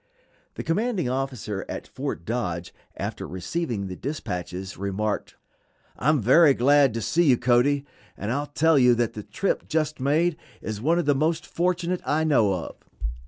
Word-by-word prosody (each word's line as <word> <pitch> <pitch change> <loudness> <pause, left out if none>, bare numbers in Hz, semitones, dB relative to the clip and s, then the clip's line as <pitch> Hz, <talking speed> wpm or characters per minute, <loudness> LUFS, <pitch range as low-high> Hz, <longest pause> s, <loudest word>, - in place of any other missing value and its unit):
The - - -5
commanding 200 - 0
officer 125 -7 -3
at - - -5
Fort 85 - -5
Dodge 90 -8 -3 0.2
after - - -4
receiving 105 - -3
the 95 -1 -5
dispatches 95 - -5
remarked: 100 +2 -2 0.6
"I 140 - 0
am 155 -2 +4
very 135 +6 +6
glad 140 -1 +4
to 115 - -2
see 170 - +2
you, 130 -5 +5
Cody, 130 +4 +2 0.3
and 105 +3 -3
I'll 145 +3 -1
tell 155 +1 +3
you 125 -1 +6
that 120 -1 0
the 105 - -6
trip 105 - -2
just 155 -1 -1
made 155 +5 +2 0.2
is 110 -1 -5
one 165 +7 +2
of 175 - 0
the 145 - +4
most 160 +4 0
fortunate 180 0 -1
I 155 +2 +1
know 130 -10 +3
of. 90 -3 -4
135 Hz, 165 wpm, -25 LUFS, 105-160 Hz, 0.6 s, very